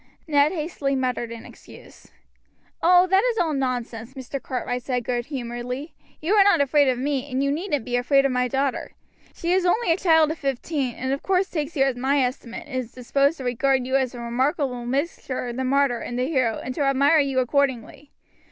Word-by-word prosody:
Ned 290 -1 +3
hastily 305 -5 -2
muttered 250 -3 -2
an 230 -1 -8
excuse. - - -15 0.7
"Oh, 360 +1 +6
that 380 +2 +3
is - - 0
all 325 -5 +1
nonsense," 245 -2 -3
Mr. 265 +1 -6
Cartwright 250 -1 -3
said 245 -1 -2
good 240 0 -2
humoredly; 250 +2 -5 0.3
"you 335 +6 0
are 415 -2 +7
not 405 -4 +4
afraid 285 +1 +3
of 255 -1 +1
me, 275 +1 -2
and 260 +1 -1
you 280 - +1
needn't 295 - -2
be 245 -1 -2
afraid 275 +3 +3
of 275 - +2
my 250 0 +1
daughter. 270 +1 -2 0.4
She 340 - -2
is 375 0 +2
only 360 +1 +2
a 330 - +3
child 320 -4 +4
of 315 - -6
fifteen, 275 -1 -2
and 260 +1 -2
of 275 - -3
course 380 0 +1
takes 305 -1 -3
you 270 - +3
at 270 -2 0
my 270 +3 +1
estimate, 250 -2 -4
and 280 -4 -5
is 245 -3 -4
disposed 275 +5 +1
to 265 - -7
regard 255 +1 +1
you 260 +1 -1
as 260 -2 0
a - - -7
remarkable 250 +1 -1
mixture 270 -1 -2
of 240 0 -5
the 260 - -1
martyr 270 -2 +2
and 240 - -5
the 250 - 0
hero, 260 -6 0
and 255 - -4
to 295 - -4
admire 280 +3 +4
you 275 -2 0
accordingly. 265 +1 0
270 Hz, 210 wpm, -24 LUFS, 250-295 Hz, 0.7 s, are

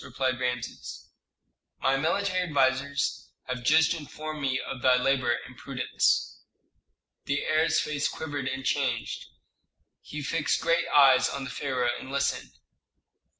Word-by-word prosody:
replied 130 -1 -2
Rameses. 125 -1 -4 0.7
"My 135 - +2
military 185 +6 0
advisers 140 -3 0
have 125 -1 -5
just 160 +5 +4
informed 155 -1 -7
me 130 -2 0
of 130 - -6
thy 130 0 +5
labor 125 -2 +2
and 125 +2 -13
prudence." 130 +1 0 0.9
The 140 0 -1
heir's 155 +1 +2
face 145 -1 -1
quivered 145 -4 -4
and 135 0 -4
changed. 125 -5 -1 0.7
He 150 -1 -7
fixed 150 +1 0
great 170 +1 +1
eyes 135 -3 +6
on 140 - -4
the 135 - -6
pharaoh 130 -4 -1
and 130 - -9
listened. 140 - -1
135 Hz, 130 wpm, -27 LUFS, 130-150 Hz, 0.9 s, eyes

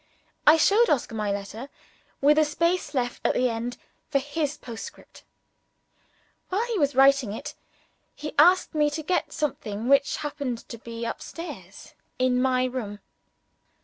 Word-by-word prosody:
I 305 +2 +9
showed 425 +8 +4
Oscar 250 -5 0
my 210 -2 -1
letter 205 +6 -5 0.5
with 295 +2 +5
a - - +6
space 335 0 0
left 245 -2 -1
at - - +2
the 250 0 +2
end 235 +2 -4 0.3
for 295 - +2
his 290 +2 -2
postscript. 230 -3 -10 1.3
While 405 +5 0
he 465 -5 -2
was 285 -3 +1
writing 270 -5 +5
it, 290 +6 -6 0.6
he 300 0 -6
asked 360 +4 +5
me 300 -1 +3
to 310 +2 -5
get 360 +4 0
something 235 -8 -3
which 275 0 +4
happened 285 -5 -4
to 230 - -8
be 230 0 -6
up - - -4
stairs 335 +1 -9 0.2
in 255 -1 +2
my 255 -1 +2
room. 240 -5 -4
275 Hz, 150 wpm, -26 LUFS, 240-305 Hz, 1.3 s, I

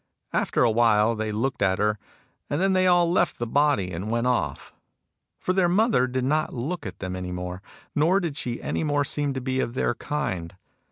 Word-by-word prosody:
After - - +1
a 120 - +4
while 110 -1 +4
they 110 -1 -3
looked 115 +5 -2
at 95 -1 +2
her, 105 0 +1 0.5
and 145 - -1
then 190 +1 +2
they 185 0 +3
all 175 -1 +4
left 180 - +1
the 120 - -2
body 140 -7 +2
and 90 +5 -4
went 115 +1 0
off. 125 -1 -1 0.6
For 185 - -1
their 185 -2 +3
mother 195 - +3
did 130 0 -2
not 155 +3 0
look 140 - -3
at 95 - -8
them 95 -1 -5
any 90 -1 -5
more, 90 +1 -5 0.3
nor 165 +6 +3
did 170 -6 -3
she 120 -4 -3
any - - -1
more 145 -2 +1
seem 145 -1 -1
to 130 - -3
be 130 +1 -1
of 120 -2 -2
their 120 - +1
kind. 100 - -4
125 Hz, 210 wpm, -25 LUFS, 105-150 Hz, 0.6 s, a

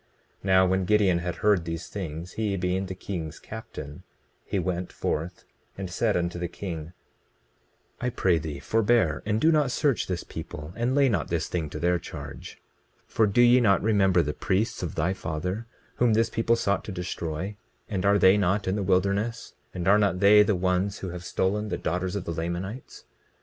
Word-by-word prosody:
20:17 - - -17
Now 95 -1 +5
when 95 0 +1
Gideon 100 -4 +3
had 90 0 -3
heard 105 -4 +2
these 85 0 -5
things, 85 -2 -6
he 105 -2 -1
being 90 +1 -1
the 95 - -5
king's 85 -5 -5
captain, 75 -10 -9 0.4
he - - -3
went 90 0 -2
forth 85 +4 -3 0.3
and 95 -2 -5
said 110 +2 +1
unto 85 0 -2
the 90 - -2
king: 85 -3 -6 1.1
I 125 - -1
pray 95 -8 +2
thee 75 -2 -5
forbear, 110 - +2
and 105 0 +1
do 160 +7 +4
not 150 -4 +3
search 135 -1 +1
this 90 -2 -3
people, 75 +3 -8
and 120 +3 0
lay 140 -1 +5
not 100 -10 0
this 85 -2 -1
thing 80 -4 -3
to - - -6
their 90 0 +2
charge. 85 - -9 0.5
20:18 - - -28
For 110 - +4
do 100 +4 +3
ye 120 +1 +6
not 100 -5 +3
remember 95 -5 +3
the 75 0 -2
priests 95 +9 -1
of 90 - -4
thy 85 +4 +1
father, 90 +6 -4 0.3
whom 120 -2 +3
this 115 +1 +2
people 115 +1 +2
sought 100 -3 0
to - - -5
destroy? 90 +1 -4 0.3
And 95 -2 -2
are 100 +1 +4
they 95 0 +6
not 100 0 +1
in 95 - +1
the 105 - -1
wilderness? 100 +4 0 0.2
And 90 -1 -4
are 105 +2 +6
not 100 -3 +1
they 105 +2 +7
the 105 -1 +3
ones 90 +2 0
who 95 - -5
have 90 0 -7
stolen 105 +4 -1
the - - -2
daughters 90 +3 -2
of 100 - -3
the 85 - -3
Lamanites? 85 +8 -5
95 Hz, 195 wpm, -26 LUFS, 85-105 Hz, 1.1 s, they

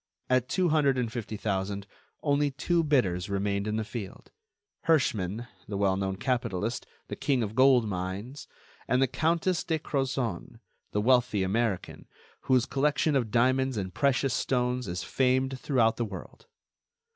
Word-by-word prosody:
At 130 0 +2
two 180 +2 +2
hundred 145 -4 +3
and 120 -3 -1
fifty 110 -3 -4
thousand, 100 -1 -2 0.4
only 145 0 +2
two 165 +5 0
bidders 100 - +1
remained 100 +1 -1
in 105 - -1
the 110 - -1
field: 105 -2 -8 0.6
Herschmann, 115 - +1 0.2
the 100 - -3
well 100 -1 +2
known 95 0 -2
capitalist, 120 -2 -2 0.2
the - - -5
king 135 -5 +1
of 105 -1 -4
gold 130 -2 +5
mines; 100 +8 -5 0.4
and 125 - +2
the 135 - +5
Countess 165 +6 0
de 160 -2 0
Crozon, 135 - -3 0.3
the 105 - 0
wealthy 125 -4 +3
American, 100 0 -2 0.4
whose 130 -3 +3
collection 145 +2 +1
of 120 -5 +1
diamonds 130 +2 +2
and 95 -3 -3
precious 135 0 +1
stones 125 -1 0
is 90 +1 -3
famed 130 0 +1
throughout 120 -6 +2
the 120 - 0
world. 105 - -10
125 Hz, 150 wpm, -28 LUFS, 100-135 Hz, 0.6 s, gold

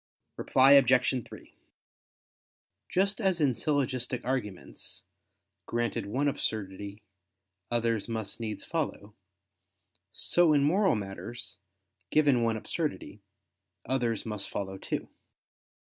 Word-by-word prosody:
Reply 135 +1 +4
Obj. 130 -2 +5
3: - - -13 1.4
Just 195 +4 +2
as 190 -4 +2
in 140 -4 +3
syllogistic 130 -3 -1
arguments, 120 -8 -4 0.6
granted 120 -2 -1
one 135 +8 0
absurdity, 100 -5 -2 0.7
others 115 -2 0
must 110 -3 -3
needs 110 -2 -4
follow; 140 -10 -3 1.0
so 175 -3 +3
in 145 -1 +4
moral 190 - +3
matters, 105 +2 -6 0.5
given 145 -3 +4
one 115 -1 +1
absurdity, 145 -5 -4 0.6
others 120 -4 -1
must 105 -3 -4
follow 95 -1 -4
too. - - -3
120 Hz, 100 wpm, -29 LUFS, 105-140 Hz, 1.4 s, Obj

